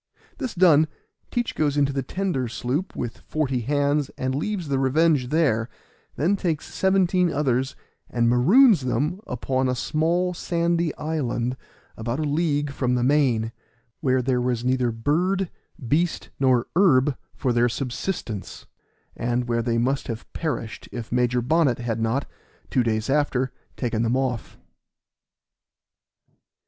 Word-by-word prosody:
This 255 -6 -4
done, 160 -4 +5 0.4
Teach 240 -1 -1
goes 145 -2 0
into 140 -1 +2
the 135 - -1
tender 155 -3 -2
sloop, 130 - -3
with 120 -2 -4
forty 135 -5 -1
hands, 145 +3 +1
and 130 0 -1
leaves 180 +4 -2
the 135 -1 0
Revenge 140 0 +3
there, 130 -7 +1 0.5
then 170 +9 +2
takes 170 -6 -3
seventeen 185 -2 +2
others 130 -3 0 0.3
and 120 -1 +1
maroons 180 - +6
them 145 - -1
upon 130 +1 -1
a 125 - 0
small 170 +7 0
sandy 170 -1 0
island, 130 -6 -2 0.4
about 115 +3 -3
a - - 0
league 145 -1 0
from 125 -3 0
the 125 - +1
main, 125 -5 +2 0.5
where 130 -3 +1
there 125 -1 +1
was 125 -1 -1
neither 125 -1 +2
bird, 175 +11 0 0.4
beast, 160 +6 0
or 125 -3 +3
herb 150 -7 +4 0.2
for 125 - 0
their 120 +1 +3
subsistence, 120 - -4 0.5
and 120 +1 -1
where 115 0 +1
they 115 0 0
must 130 +4 0
have 115 -2 -5
perished 145 -9 -4
if 120 -3 -6
Major 125 0 +1
Bonnet 145 -2 +2
had 120 -2 -3
not, 115 +5 0 0.5
two 130 - +3
days 110 -1 0
after, 135 -2 +1 0.3
taken 115 -3 -1
them 120 +2 +1
off. 130 -4 -2
135 Hz, 140 wpm, -24 LUFS, 120-160 Hz, 0.5 s, maroons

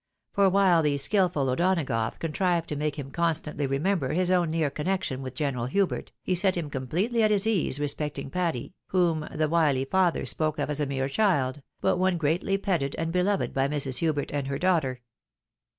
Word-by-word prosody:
For 200 -1 +4
while 185 -3 +4
the 145 -2 +1
skilful 175 -3 +1
O'Donagough 130 -7 0
contrived 170 +1 0
to 150 - -2
make 150 0 -2
him 135 -2 -6
con 170 0 +1
stantly 150 -3 -4
remember 145 0 0
his 180 +2 +1
own 175 -3 +2
near 160 -3 0
connection 150 -3 -2
with 130 -1 -7
General 130 -4 -1
Hubert, 195 +7 -1
he 185 - 0
set 185 +1 +2
him 155 -4 -4
completely 180 - -1
at 215 - +4
his 205 -1 +2
ease 190 -10 +1
respecting 145 -1 -2
Patty, 170 -6 -2
whom 170 -4 +1
the 155 - 0
wily 150 -5 +2
father 180 +3 +1
spoke 155 0 -1
of 150 0 -2
as 150 - 0
a 145 - 0
mere 135 -1 -1
child, 145 -6 +1 0.2
but - - +2
one 185 -1 +2
greatly 170 +5 0
petted 170 -9 -1
and 165 0 -2
beloved 185 +3 0
by 135 0 +1
Mrs. 140 -3 0
Hubert 155 -4 -1
and 140 -2 -2
her 140 0 -2
daughter. 155 -8 +1
155 Hz, 190 wpm, -27 LUFS, 140-185 Hz, 0.2 s, For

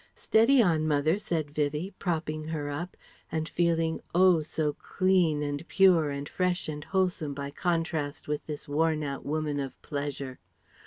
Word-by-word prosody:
"Steady 235 +3 +4
on, 160 -5 +2
mother," 155 +5 +2
said 165 -8 -2
Vivie, 150 +6 -1
propping 155 -3 -2
her 150 -2 -3
up, 170 +6 -5 0.3
and 160 -1 -1
feeling 165 -2 +1
oh! 180 -2 +6
so 150 -1 -1
clean 180 -4 +1
and 145 +3 -4
pure 180 -6 +5
and 140 0 -4
fresh 180 -1 -1
and 150 -1 -5
wholesome 180 -6 0
by 140 0 -5
contrast 165 -3 -2
with 150 0 -2
this 150 -2 -6
worn 155 +1 +1
out 140 -1 -4
woman 150 -1 -1
of 135 -2 -5
pleasure. 140 -3 -4
155 Hz, 155 wpm, -28 LUFS, 145-175 Hz, 0.3 s, oh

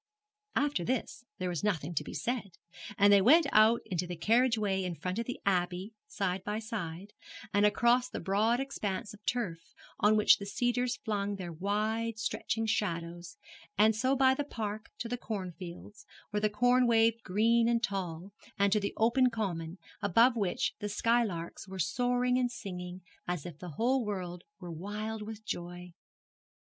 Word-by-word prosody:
After 285 -9 +1
this 245 +3 -3
there 185 - -2
was 175 0 -3
nothing 175 -6 -1
to 150 - -1
be - - -8
said, 220 -8 -3 0.4
and 205 0 +6
they 200 - +7
went 305 - +6
out 220 +2 +5
into 180 -1 -2
the 175 - -4
carriage 230 +7 +3
way 195 -3 0
in 180 -2 -3
front 185 +5 -3
of 230 - -3
the 250 - -4
Abbey, 185 +2 0
side 195 - -2
by 210 +2 -2
side, 205 -4 -5 0.4
and 205 +1 +5
across 240 +4 +3
the - - -5
broad 215 +5 +2
expanse 210 -8 -3
of 210 0 -15
turf, 175 -10 -3 0.2
on 215 +1 +4
which 210 - +6
the 200 - -5
cedars 245 +3 0
flung 205 -6 -2
their 180 -3 -6
wide 215 +5 -1
stretching 225 +1 -2
shadows, 170 -5 -2 0.4
and 215 +2 +5
so 260 +4 +2
by 265 0 +5
the 290 - -1
Park 215 -5 -5
to 235 - -4
the 245 +1 -3
corn 195 -6 -4
fields, 190 +4 -10 0.2
where 210 0 -1
the 215 - +3
corn 245 +4 +3
waved 230 0 +3
green 230 +4 +3
and 235 0 +1
tall, 190 -4 -3 0.3
and 200 0 +3
to 210 - +3
the 200 - -3
open 250 +3 +4
common, 180 -7 -3 0.2
above 230 +6 +4
which 200 -6 0
the 210 - -3
skylarks 205 -6 0
were 190 0 -7
soaring 250 +5 +1
and 250 -1 +1
singing 180 -5 -7 0.3
as 175 -4 -3
if 165 -4 -8
the 180 - -7
whole 250 - +1
world 180 -4 -4 0.2
were 175 -2 -7
wild 210 +6 -5
with 215 0 -8
joy. 175 -1 -6
210 Hz, 175 wpm, -31 LUFS, 180-230 Hz, 0.4 s, they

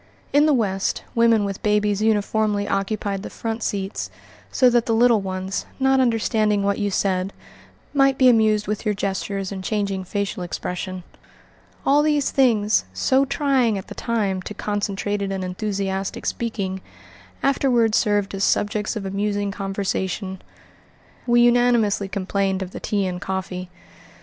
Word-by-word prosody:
In 295 +2 +5
the 305 - +4
West, 195 -5 -1
women 230 -3 +4
with 195 -1 -4
babies 210 -1 +1
uniformly 210 -1 +1
occupied 195 0 -1
the - - -7
front 225 0 -4
seats 195 -1 -3 0.4
so 255 - +4
that 240 -1 +3
the 225 - +2
little 235 -2 +4
ones, 190 0 -4
not 265 0 +3
understanding 220 -4 +2
what 200 0 0
you 205 -1 0
said, 190 -1 0 0.6
might 275 -1 +3
be 260 - +5
amused 215 -3 +4
with 210 0 -3
your 210 -2 0
gestures 195 0 -3
and 190 -1 -5
changing 200 -2 -1
facial 200 0 -3
expression. 180 +1 -4 0.8
All 285 +2 +5
these 295 -2 +1
things, 220 - +3
so 260 - +2
trying, 270 -6 +1
at 190 - -8
the - - -6
time, 205 -5 -1
to 210 - -7
concentrated 205 -1 -2
and 190 -1 -3
enthusiastic 195 0 -3
speaking, 195 -5 -3 0.6
afterward 250 -5 +2
served 205 -3 +1
as 195 0 -2
subjects 210 +3 0
of 210 -2 -4
amusing 200 +1 -1
conversation. 195 -1 -3 0.9
We 240 0 +5
unanimously 240 -4 +3
complained 195 0 -1
of 185 - -8
the - - -7
tea 200 -2 -1
and 180 -1 -4
coffee. 185 -1 -4
Mrs. 180 - -24
205 Hz, 150 wpm, -22 LUFS, 195-230 Hz, 0.9 s, In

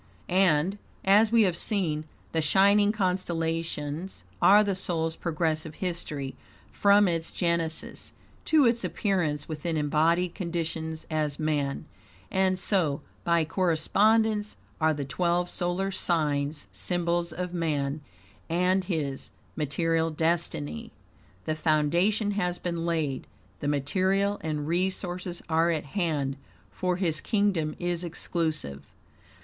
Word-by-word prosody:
And, 185 +1 +2 0.3
as 210 +3 +5
we 230 -1 +6
have 180 -4 +1
seen, 165 -7 0 0.3
the 165 - +1
shining 200 +6 +4
constellations 165 - -2 0.2
are 205 +2 +7
the 200 -1 0
soul's 165 -3 -1
progressive 160 -2 -2
history 155 -7 -4 0.4
from 200 0 +5
its 165 -2 -1
genesis, 170 -2 -2 0.3
to 310 -3 +5
its 235 0 +2
appearance 165 -8 -1
within 160 +1 -3
embodied 165 +4 +2
conditions 165 -3 -3
as 150 -2 0
man; 150 -2 -1 0.5
and 190 -1 +2
so, 175 -7 +1 0.2
by 170 -1 +2
correspondence, 210 +6 +2 0.2
are 160 -1 +3
the 145 -1 -3
twelve 175 +5 0
solar 180 +2 -1
signs 150 -5 0
symbols 175 -1 -1
of 180 +2 -4
man 150 -4 -1 0.5
and 180 +3 +2
his 150 -7 -3 0.3
material 165 +2 0
destiny. 155 - -1 0.5
The 155 - 0
foundation 170 +8 +2
has 180 -4 -1
been 170 -1 -3
laid, 155 -6 -1 0.3
the - - -3
material 190 +8 +1
and 150 -2 -3
resources 180 0 -2
are 165 +1 +3
at 160 -3 -1
hand, 145 -5 -1 0.3
for 180 -1 -1
his 170 -4 -1
kingdom 200 -8 +1
is 175 0 -2
exclusive. 160 - -2
170 Hz, 115 wpm, -27 LUFS, 155-185 Hz, 0.5 s, are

